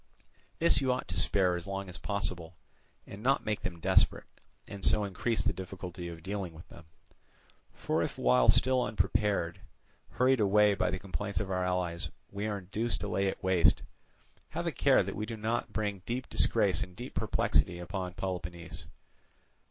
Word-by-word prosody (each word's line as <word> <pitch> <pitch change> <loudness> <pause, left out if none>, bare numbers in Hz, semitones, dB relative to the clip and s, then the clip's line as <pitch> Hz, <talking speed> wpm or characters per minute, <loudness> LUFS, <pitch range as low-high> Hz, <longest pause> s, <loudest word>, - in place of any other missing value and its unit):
This 170 -2 +3
you 130 -1 +2
ought 125 - -2
to 90 +1 -1
spare 90 -1 +2
as 90 +2 -5
long 100 0 -4
as 90 -1 -7
possible, 90 -4 -3 0.5
and 100 - -10
not 135 +4 +2
make 105 -1 -1
them 85 -2 -4
desperate, - - +3 0.4
and 100 -1 -8
so 105 - +4
increase 105 +4 -1
the - - +1
difficulty 90 -2 -7
of 85 -1 -8
dealing 95 -3 -4
with 80 - -12
them. - - -13 0.9
For - - -1
if - - -2
while 60 0 +4
still 130 0 +4
unprepared, 100 -5 0 0.5
hurried 130 0 +3
away 105 0 +5
by 100 - +1
the 95 - -1
complaints 100 +1 -3
of 95 -2 -3
our 90 0 0
allies, 90 -2 -1 0.2
we 100 +2 -3
are 105 -1 -2
induced 105 +5 -1
to 105 - -2
lay 100 0 0
it 95 - -3
waste, 90 -4 +4 0.7
have - - -4
a - - 0
care - - +4
that - - -5
we 105 +1 -3
do 115 -1 -5
not 110 +2 -1
bring 105 -3 -2
deep 125 +2 -2
disgrace - - +2
and 90 - -5
deep 120 +5 -8
perplexity 75 +5 +1
upon 90 +1 -5
Peloponnese. 85 -3 -5
95 Hz, 175 wpm, -31 LUFS, 90-105 Hz, 0.9 s, away